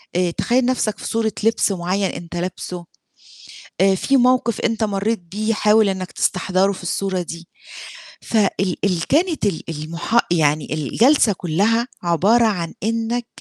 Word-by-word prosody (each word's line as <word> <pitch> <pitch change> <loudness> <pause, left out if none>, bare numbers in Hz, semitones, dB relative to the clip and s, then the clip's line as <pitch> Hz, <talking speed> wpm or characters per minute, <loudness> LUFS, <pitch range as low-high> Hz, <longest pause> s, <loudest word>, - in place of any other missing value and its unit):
آآ، 180 -1 +1
تخيّل 245 +7 +1
نَفْسك 245 -4 0
في - - -6
صورة 225 -1 0
لبس 225 -2 +2
معيّن 190 +2 -1
أنت 170 0 -8
لابسُه 180 0 -5 1.0
آآ، 195 0 +5
في 275 +8 +1
موقف 250 -3 +2
أنت 225 -1 0
مرّيت 210 +2 -1
بيه 215 +6 -2
حاول 210 0 +4
إنك 190 -1 -4
تستحضرُه 190 +1 +1
في 185 - -9
الصورة 185 +1 -2
دي 170 0 -9 0.7
فال 195 -4 0
ال 175 -4 0
كانت 320 - +1
ال 185 -6 -1
المح 170 +9 0
يعني 155 -3 +1
الجلسة 220 - +3
كلّها 205 +8 +1 0.2
عبارة 200 +8 +3
عن 175 -6 -1
إنك 230 +2 -1
195 Hz, 145 wpm, -20 LUFS, 175-225 Hz, 1.0 s, آآ